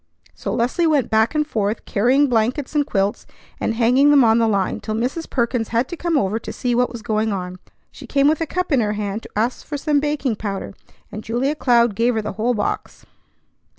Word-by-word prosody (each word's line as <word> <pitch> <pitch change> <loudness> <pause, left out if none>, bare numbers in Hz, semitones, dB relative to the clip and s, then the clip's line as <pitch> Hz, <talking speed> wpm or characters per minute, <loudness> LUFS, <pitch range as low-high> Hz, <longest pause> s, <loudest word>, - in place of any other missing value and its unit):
So - - -5
Leslie 255 +8 +1
went 295 -6 +1
back 220 +5 +2
and 300 0 +2
forth, 215 -6 -2
carrying 250 +8 +3
blankets 250 +4 0
and 295 -2 +1
quilts, 195 +1 -1 0.3
and 225 - -1
hanging 250 +5 +4
them 285 -3 +6
on 225 0 +4
the 230 - +3
line, 200 -3 0
till 215 - -4
Mrs. 255 +9 -3
Perkins 235 -2 0
had 235 +2 0
to - - -5
come 340 -2 0
over 215 -3 0
to - - -7
see 245 -1 -2
what 245 +1 +1
was 235 -3 -8
going 220 -1 0
on. 185 -2 -5 0.3
She - - -12
came 280 0 +2
with 310 +1 +2
a 325 - -1
cup 365 +1 -3
in 275 - +4
her 210 -2 0
hand 210 0 -3
to - - -12
ask 230 +4 -1
for 295 - -5
some 295 0 +1
baking 290 -6 -1
powder, 200 -2 -5 0.4
and 215 +1 -7
Julia 245 +6 -1
Cloud 240 -6 +3
gave 235 +4 +1
her 220 - 0
the 210 - -3
whole 235 +3 0
box. 210 - -4
235 Hz, 220 wpm, -21 LUFS, 215-280 Hz, 0.4 s, them